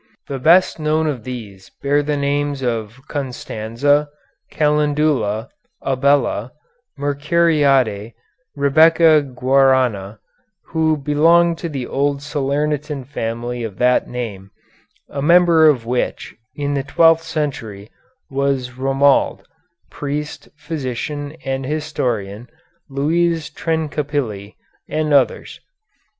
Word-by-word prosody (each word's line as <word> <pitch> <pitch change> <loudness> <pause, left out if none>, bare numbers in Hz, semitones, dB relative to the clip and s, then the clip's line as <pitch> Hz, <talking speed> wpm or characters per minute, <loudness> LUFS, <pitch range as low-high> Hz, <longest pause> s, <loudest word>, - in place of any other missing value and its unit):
The 135 -1 -4
best 170 +6 +4
known 155 +1 +1
of 135 -7 -3
these 105 -7 -8
bear 145 +1 +2
the 145 0 -2
names 140 -1 -1 0.4
Constanza, 140 +1 -1 0.4
Calendula, 150 -7 +1 0.3
Abella, 135 -3 +1 0.4
Mercuriade, 140 -6 +1 0.4
Rebecca 155 +2 +5
Guarna, 130 -6 +1 0.5
who 160 -1 +1
belonged 165 +4 +3
to 170 - -4
the 135 -5 -4
old 140 +1 -1
Salernitan 145 0 -2
family 120 -2 -4
of 105 -4 -6
that 125 0 +2
name, 105 -6 -6 0.6
a 140 - -5
member 170 0 +5
of 125 -6 0
which, 125 +1 -2 0.2
in 145 0 -2
the 140 - 0
twelfth 165 +3 +4
century, 135 -11 -4 0.4
was 135 -2 -1
Romuald, 135 +1 +2 0.5
priest, 150 +1 -5
physician, 145 0 -5
and 135 0 -2
historian, 125 -7 -3 0.4
Louise 160 +3 0
Trencapilli, 145 -10 -3 0.3
and 155 -1 -1
others. 135 -3 +1
140 Hz, 95 wpm, -19 LUFS, 125-150 Hz, 0.6 s, Rebecca